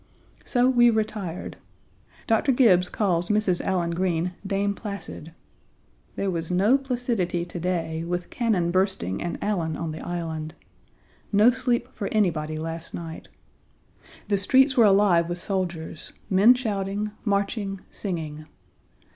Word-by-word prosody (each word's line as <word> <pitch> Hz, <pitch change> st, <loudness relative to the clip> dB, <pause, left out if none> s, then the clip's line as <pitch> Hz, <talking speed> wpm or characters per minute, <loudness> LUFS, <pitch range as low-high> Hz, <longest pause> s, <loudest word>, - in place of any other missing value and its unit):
So 245 Hz, -1 st, +2 dB
we 240 Hz, -2 st, +5 dB
retired. 215 Hz, -6 st, -3 dB, 0.7 s
Dr. 225 Hz, +5 st, +2 dB
Gibbes 195 Hz, -9 st, +4 dB
calls 180 Hz, -5 st, 0 dB
Mrs. 210 Hz, -4 st, +2 dB
Allen 175 Hz, -3 st, 0 dB
Green 175 Hz, 0 st, -1 dB
Dame 200 Hz, 0 st, 0 dB
Placid. 200 Hz, -6 st, -7 dB, 0.8 s
There 195 Hz, -1 st, -1 dB
was 165 Hz, -2 st, -3 dB
no 195 Hz, +8 st, +4 dB
placidity 240 Hz, -10 st, -1 dB
to 175 Hz, 0 st, -7 dB
day, 165 Hz, -2 st, -2 dB
with 175 Hz, +1 st, -4 dB
cannon 205 Hz, -8 st, +1 dB
bursting 185 Hz, -, 0 dB
and 175 Hz, -, -3 dB
Allen 170 Hz, -7 st, -1 dB
on 165 Hz, -1 st, -3 dB
the 155 Hz, -, -7 dB
Island. 160 Hz, -3 st, -4 dB, 0.8 s
No 210 Hz, +4 st, +6 dB
sleep 245 Hz, -1 st, 0 dB
for 200 Hz, -, -4 dB
anybody 155 Hz, -7 st, 0 dB
last 165 Hz, +1 st, -5 dB
night. 165 Hz, -1 st, -7 dB, 1.0 s
The 200 Hz, -2 st, +1 dB
streets 265 Hz, +7 st, +4 dB
were 235 Hz, -, +6 dB
alive 195 Hz, -4 st, +4 dB
with 175 Hz, -, -2 dB
soldiers, 175 Hz, -4 st, -4 dB, 0.2 s
men 205 Hz, +7 st, +7 dB
shouting, 205 Hz, -3 st, -2 dB
marching, 200 Hz, -1 st, -1 dB
singing. 155 Hz, -5 st, -5 dB
190 Hz, 130 wpm, -25 LUFS, 170-215 Hz, 1.0 s, men